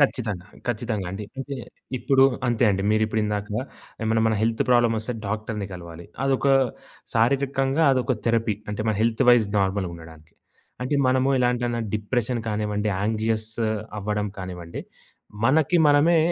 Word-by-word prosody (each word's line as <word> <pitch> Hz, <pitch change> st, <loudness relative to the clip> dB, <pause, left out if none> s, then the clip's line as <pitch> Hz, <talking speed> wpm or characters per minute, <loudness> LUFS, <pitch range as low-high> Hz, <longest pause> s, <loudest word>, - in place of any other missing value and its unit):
ఖచ్చితంగా. 110 Hz, -10 st, 0 dB, 0.2 s
ఖచ్చితంగా 110 Hz, -4 st, -2 dB
అండి. 100 Hz, +2 st, -5 dB, 0.7 s
ఇప్పుడు 135 Hz, +2 st, +4 dB, 0.2 s
అంతే 120 Hz, 0 st, +2 dB
అండి. 95 Hz, 0 st, 0 dB
మీరు 110 Hz, 0 st, +2 dB
ఇప్పుడు 110 Hz, 0 st, -1 dB
ఇందాక 105 Hz, 0 st, -2 dB, 0.6 s
ఏమైనా 110 Hz, 0 st, +2 dB
మన 110 Hz, -, +2 dB
హెల్త్ 115 Hz, 0 st, +1 dB
ప్రాబ్లమ్ 120 Hz, -2 st, +4 dB
వస్తే 115 Hz, +3 st, -4 dB
డాక్టర్‌ని 105 Hz, -1 st, -3 dB
కలవాలి. 85 Hz, -1 st, -9 dB, 0.2 s
అదొక 135 Hz, 0 st, +1 dB, 0.7 s
శారీరకంగా 135 Hz, +5 st, +2 dB
అదొక 130 Hz, 0 st, +1 dB
థెరపీ 115 Hz, -2 st, +2 dB, 0.2 s
అంటే 105 Hz, -, -4 dB
మన 110 Hz, -, +2 dB
హెల్త్ 115 Hz, +2 st, +2 dB
వైస్ 120 Hz, -3 st, +5 dB
నార్మల్‌గా 95 Hz, -2 st, 0 dB
ఉండడానికి. 80 Hz, -1 st, -14 dB, 0.5 s
అంటే 130 Hz, +3 st, 0 dB
మనము 130 Hz, +1 st, +2 dB
ఇలాంటి 125 Hz, 0 st, +1 dB, 0.3 s
డిప్రెషన్ 120 Hz, +3 st, -1 dB
కానివ్వండి 105 Hz, 0 st, -1 dB
యాంక్సియస్ 110 Hz, +1 st, -1 dB, 0.5 s
అవ్వడం 105 Hz, 0 st, -1 dB
కానివ్వండి. 90 Hz, -2 st, -6 dB, 0.6 s
మనకి 155 Hz, +5 st, +3 dB
మనమే 150 Hz, +4 st, +5 dB
110 Hz, 130 wpm, -24 LUFS, 105-125 Hz, 0.7 s, వైస్